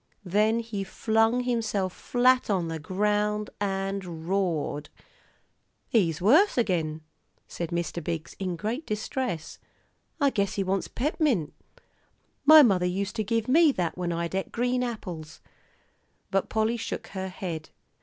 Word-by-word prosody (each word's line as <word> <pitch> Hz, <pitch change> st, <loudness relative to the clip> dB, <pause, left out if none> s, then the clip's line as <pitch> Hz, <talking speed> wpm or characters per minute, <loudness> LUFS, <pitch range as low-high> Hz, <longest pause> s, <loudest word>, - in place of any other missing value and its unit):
Then 215 Hz, +5 st, +2 dB
he 220 Hz, -4 st, -4 dB
flung 225 Hz, +4 st, +1 dB
himself 220 Hz, -6 st, -1 dB
flat 255 Hz, 0 st, +2 dB
on 180 Hz, -5 st, 0 dB
the 165 Hz, 0 st, -4 dB
ground 210 Hz, +5 st, 0 dB
and 195 Hz, -4 st, -3 dB
roared. 175 Hz, -6 st, -1 dB, 1.0 s
"He's 170 Hz, -9 st, +2 dB
worse 295 Hz, -, +5 dB
agin," 165 Hz, -9 st, 0 dB, 0.5 s
said 170 Hz, -2 st, -5 dB
Mr. 170 Hz, 0 st, -3 dB
Biggs, 165 Hz, 0 st, -4 dB
in 185 Hz, -2 st, -2 dB
great 225 Hz, -, -4 dB
distress. 210 Hz, -, -3 dB, 0.6 s
"I 280 Hz, -1 st, +3 dB
guess 200 Hz, -5 st, 0 dB
he 200 Hz, -, 0 dB
wants 190 Hz, 0 st, -1 dB
pep'mint. 265 Hz, -, 0 dB, 0.9 s
My 310 Hz, 0 st, +10 dB
mother 185 Hz, -7 st, +3 dB
used 195 Hz, +4 st, -2 dB
to 215 Hz, -, +1 dB
give 225 Hz, +1 st, -1 dB
me 310 Hz, +4 st, +6 dB
that 175 Hz, -6 st, -1 dB
when 180 Hz, -1 st, -2 dB
I'd 170 Hz, +1 st, -2 dB
et 190 Hz, 0 st, -2 dB
green 250 Hz, +1 st, 0 dB
apples." 180 Hz, -10 st, -6 dB, 0.9 s
But 195 Hz, 0 st, 0 dB
Polly 220 Hz, +2 st, +1 dB
shook 225 Hz, -, -5 dB
her 190 Hz, -1 st, -4 dB
head. 170 Hz, -4 st, -5 dB
200 Hz, 135 wpm, -27 LUFS, 175-230 Hz, 1.0 s, My